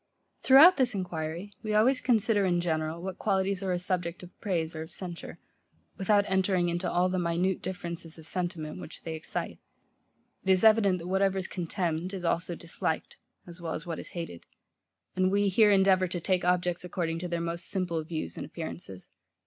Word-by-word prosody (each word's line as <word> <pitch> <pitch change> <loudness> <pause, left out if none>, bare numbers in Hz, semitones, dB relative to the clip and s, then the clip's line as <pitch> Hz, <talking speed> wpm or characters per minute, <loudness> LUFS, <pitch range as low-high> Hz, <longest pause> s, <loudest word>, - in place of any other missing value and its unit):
Throughout 295 +8 +8
this 250 -5 +3
enquiry, 175 0 -4
we 215 -1 -2
always 255 +5 +4
consider 220 -4 +2
in 175 -2 +2
general, 160 0 -2
what 190 0 -5
qualities 195 -1 0
are 190 -1 -1
a 180 - +1
subject 180 -1 -2
of 180 - -12
praise 165 -6 -1
or 155 - -4
of 160 - -7
censure, 175 -3 -7 0.6
without 200 +1 +3
entering 190 -2 +2
into 175 +1 -1
all 180 +1 +3
the 185 0 -1
minute 175 +2 0
differences 170 -2 -5
of 160 - -10
sentiment, 170 -4 -4
which - - -10
they 165 - -4
excite. 160 0 -4 0.8
It 190 - -3
is 185 +1 +5
evident, 215 -4 +5
that 170 0 -7
whatever 195 +1 +2
is 190 - -2
contemned, 175 0 -2
is 180 -2 -5
also 170 +1 0
disliked, 165 -1 -3 0.3
as 175 0 -11
well 165 -1 -3
as 160 - -6
what 165 -2 -4
is - - -5
hated; 165 - -6 0.7
and 185 0 +2
we 200 0 +3
here 210 +3 +5
endeavour 190 -2 +4
to 175 0 -3
take 185 +1 +1
objects, 180 -1 +1
according 170 -2 -2
to 180 - -4
their 170 -1 -2
most 170 0 -3
simple 175 -4 -1
views 155 - -5
and - - -4
appearances. 90 +3 -8
180 Hz, 190 wpm, -29 LUFS, 170-190 Hz, 0.8 s, Throughout